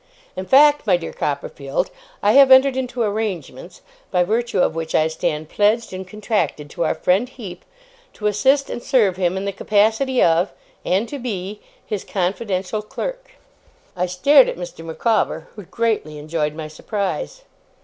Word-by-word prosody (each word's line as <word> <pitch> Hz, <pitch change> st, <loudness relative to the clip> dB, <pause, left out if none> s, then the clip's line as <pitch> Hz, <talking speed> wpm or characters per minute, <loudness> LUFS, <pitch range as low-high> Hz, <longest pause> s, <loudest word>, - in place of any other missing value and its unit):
In 185 Hz, 0 st, -5 dB
fact, 290 Hz, -1 st, +5 dB
my 185 Hz, -3 st, +5 dB
dear 165 Hz, -1 st, -7 dB
Copperfield, 140 Hz, -1 st, -3 dB, 0.3 s
I 205 Hz, -, +5 dB
have 275 Hz, +2 st, +7 dB
entered 260 Hz, 0 st, +6 dB
into 250 Hz, -2 st, -2 dB
arrangements, 210 Hz, -3 st, -4 dB, 0.3 s
by 180 Hz, -2 st, +2 dB
virtue 230 Hz, +3 st, -1 dB
of 170 Hz, -, +2 dB
which 165 Hz, 0 st, -4 dB
I 155 Hz, -, +4 dB
stand 155 Hz, -1 st, -2 dB
pledged 215 Hz, +1 st, +1 dB
and 185 Hz, 0 st, -6 dB
contracted 205 Hz, -7 st, -2 dB
to 170 Hz, -, -2 dB
our -, -, 0 dB
friend 195 Hz, +8 st, +1 dB
Heep, 195 Hz, -9 st, -9 dB, 0.5 s
to 210 Hz, -, -8 dB
assist 265 Hz, +7 st, +2 dB
and 240 Hz, -, -5 dB
serve 220 Hz, -9 st, +2 dB
him 185 Hz, 0 st, 0 dB
in 195 Hz, -, -3 dB
the 200 Hz, -, -1 dB
capacity 220 Hz, +6 st, +1 dB
of 170 Hz, +3 st, +3 dB, 0.3 s
and 195 Hz, +6 st, +1 dB
to 285 Hz, -, -6 dB
be 205 Hz, -4 st, -5 dB, 0.2 s
his 205 Hz, -3 st, -4 dB
confidential 195 Hz, +1 st, -2 dB
clerk.' -, -, -6 dB, 0.6 s
I 180 Hz, 0 st, -1 dB
stared 260 Hz, +10 st, +5 dB
at -, -, -5 dB
Mr. 175 Hz, -2 st, -8 dB
Micawber, 210 Hz, +7 st, -1 dB
who 205 Hz, -3 st, -10 dB
greatly 215 Hz, -9 st, -2 dB
enjoyed 150 Hz, 0 st, -2 dB
my 155 Hz, -1 st, -6 dB
surprise. 205 Hz, -, -4 dB
205 Hz, 160 wpm, -21 LUFS, 175-235 Hz, 0.6 s, have